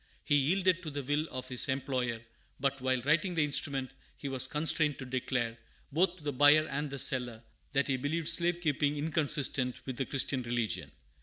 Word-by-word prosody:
He - - 0
yielded 180 +6 +3
to 160 - -5
the 145 -1 -4
will 145 +4 0
of 130 0 -6
his 125 +2 -1
employer, 130 -3 -1 0.4
but, 135 0 -1
while 130 0 +1
writing 155 +7 +2
the 160 - +3
instrument, 140 -2 0 0.3
he 140 - -6
was 130 -1 +1
constrained 150 -1 +1
to 130 - -6
declare, 125 -2 -2 0.3
both 175 +4 +2
to 160 - -15
the 145 -1 -2
buyer 145 +3 +6
and 145 +2 -2
the 140 - -5
seller, 125 -4 0 0.3
that 140 0 +2
he 135 -2 +1
believed 155 +5 -2
slave 170 +1 +1
keeping 145 -2 +1
inconsistent 145 -4 +1
with 130 -2 -5
the 135 - -2
Christian 135 -1 -1
religion. 120 -2 -2
140 Hz, 185 wpm, -31 LUFS, 130-155 Hz, 0.4 s, buyer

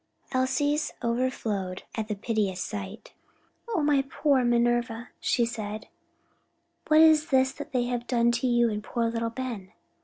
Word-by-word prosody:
Elsie's 290 +3 0
overflowed 230 -6 -2
at 220 -2 -3
the 210 - -2
piteous 205 -3 -1
sight. 200 +2 -6 0.5
"O 405 -10 0
my 290 -2 +3
poor 275 -2 +2
Minerva," 240 0 +1
she 240 - +1
said, 215 -2 -5 1.0
"what 310 0 +6
is 315 -1 +6
this 265 -1 +3 0.2
they 250 -2 +1
have 245 -1 -3
done 235 -2 +3
to 235 +2 0
you 240 -1 +3
and 210 0 -4
poor 235 +1 -1
little 230 0 -1
Ben?" 230 -6 -6
240 Hz, 145 wpm, -27 LUFS, 220-260 Hz, 1.0 s, what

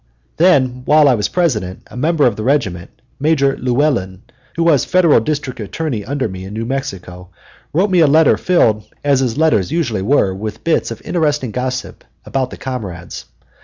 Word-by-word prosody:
Then, 130 -8 +3
while 150 0 +5
I 135 - +5
was 105 -4 0
President, 110 - -1
a - - -15
member 150 +3 +1
of 120 -4 +2
the 110 - -6
regiment, 110 -9 -1 0.3
Major 140 -2 +2
Llewellyn, 120 -8 -1 0.3
who 170 - 0
was 155 -6 +3
Federal 175 -7 +4
District 140 +1 -3
Attorney 115 +2 -4
under 135 +3 -2
me 95 -2 -8
in 100 +2 -8
New 115 +1 -3
Mexico, 90 -8 -5 0.4
wrote 190 +6 +1
me 180 - +4
a 160 - +5
letter 155 +3 +5
filled, 110 -12 +2 0.2
as 140 -2 +3
his 130 -2 -1
letters 150 - +2
usually 120 - -1
were, 100 -3 +2
with 105 +3 -6
bits 165 - +1
of 115 -1 -8
interesting 150 -7 -1
gossip 130 +2 -4 0.2
about 130 -2 -2
the - - -10
comrades. 100 -10 -6
130 Hz, 175 wpm, -17 LUFS, 105-150 Hz, 0.4 s, while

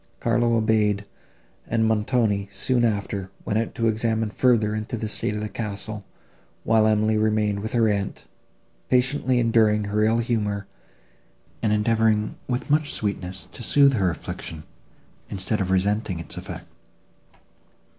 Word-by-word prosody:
Carlo 120 0 +2
obeyed, 105 -2 +2 0.6
and 115 0 +1
Montoni, 110 -2 +1
soon 120 +4 +1
after, 100 -3 -1 0.2
went 105 - +1
out 115 - -3
to 115 -3 +1
examine 110 0 0
further 110 -3 +2
into 110 +2 -3
the 110 - -3
state 105 0 -3
of 105 - -3
the 105 - -2
castle; 105 0 -5 0.6
while 110 -1 +4
Emily 110 0 +2
remained 105 -1 +1
with 110 +2 -4
her 115 -2 +3
aunt, 100 -2 -2 0.6
patiently 130 0 +2
enduring 110 -3 +3
her 105 +1 0
ill 110 +1 +3
humour, 105 -4 -1 1.0
and 110 - +1
endeavouring, 110 0 +2
with 125 0 -2
much 150 0 +2
sweetness, 95 -2 -3
to - - -9
soothe 140 +3 +5
her 95 -6 +2
affliction, 80 -1 -6 0.7
instead 100 +2 -2
of 95 - -1
resenting 95 0 +1
its 85 -2 -6
effect. - - -7
110 Hz, 140 wpm, -24 LUFS, 105-115 Hz, 1.0 s, soothe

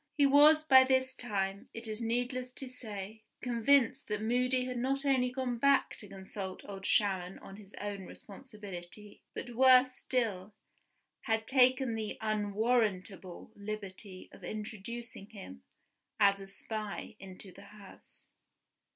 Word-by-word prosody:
He 285 - +5
was 295 +3 +7
by 265 -3 +8
this 260 0 +1
time, 200 -5 -3
it 230 0 -5
is 215 +1 -5
needless 245 +2 -1
to 270 - -5
say, 220 -4 -8 0.2
convinced 250 +2 +2
that 210 -1 -2
Moody 250 +2 +1
had 250 -1 -3
not 275 +3 -1
only 260 -2 +3
gone 250 -2 -3
back 280 +2 +3
to 210 - -9
consult 190 0 -7
Old 195 -1 -6
Sharon 190 -3 +1
on 195 - -11
his 205 -1 -14
own 200 -2 -5
responsibility, 205 -3 -10
but 240 - -6
worse 255 +1 +6
still, 215 -8 -2 0.7
had 225 0 0
taken 255 -1 +3
the 220 -1 -4
unwarrantable 210 -3 -1
liberty 200 -2 -7
of - - -15
introducing 215 0 -7
him, 190 - -10 0.6
as 200 -1 +4
a 195 - -9
spy, 215 +2 -6
into 190 0 -9
the 195 - -14
house. 205 -1 -16
220 Hz, 135 wpm, -32 LUFS, 200-250 Hz, 0.7 s, by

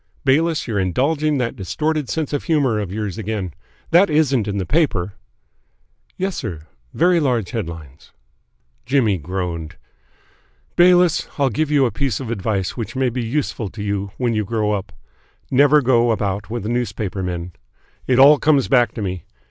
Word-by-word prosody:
"Bayliss, 155 +4 +2
you're 110 -4 -1
indulging 145 - +1
that 125 -3 -2
distorted 150 - -2
sense 155 -3 -2
of 145 - -2
humour 140 -10 +2
of 100 -4 -4
yours 105 0 -4
again. 100 -5 -3 0.4
That 175 +3 +5
isn't 140 -8 +2
in 100 -1 -2
the 95 - -2
paper?" 105 - 0 1.0
"Yes, 190 -1 -2
sir. 90 - -5 0.3
Very 175 +1 +3
large 125 - 0
headlines." 80 - -7 0.7
Jimmy 120 -7 +1
groaned. 85 -1 -4 1.0
"Bayliss, 175 -1 +4
I'll 140 -3 +2
give 155 +7 -1
you 145 -3 +3
a 120 - 0
piece 130 +4 -2
of 125 -4 -5
advice 100 -3 -2
which 115 0 -5
may 130 -1 +1
be 125 +1 -3
useful 115 -3 -2
to 105 +2 -7
you 100 -1 -2
when 120 -2 0
you 110 -1 0
grow 105 0 -1
up. 100 -1 -3 0.6
Never 145 +2 +5
go 120 -1 +3
about 100 -2 -1
with 115 -2 -4
newspaper 110 -4 -2
men. 90 -1 -4 0.6
It 125 - +3
all 145 +3 +7
comes 145 -4 +3
back 125 -3 +3
to 110 - -4
me. 90 -4 -4
115 Hz, 165 wpm, -20 LUFS, 100-145 Hz, 1.0 s, all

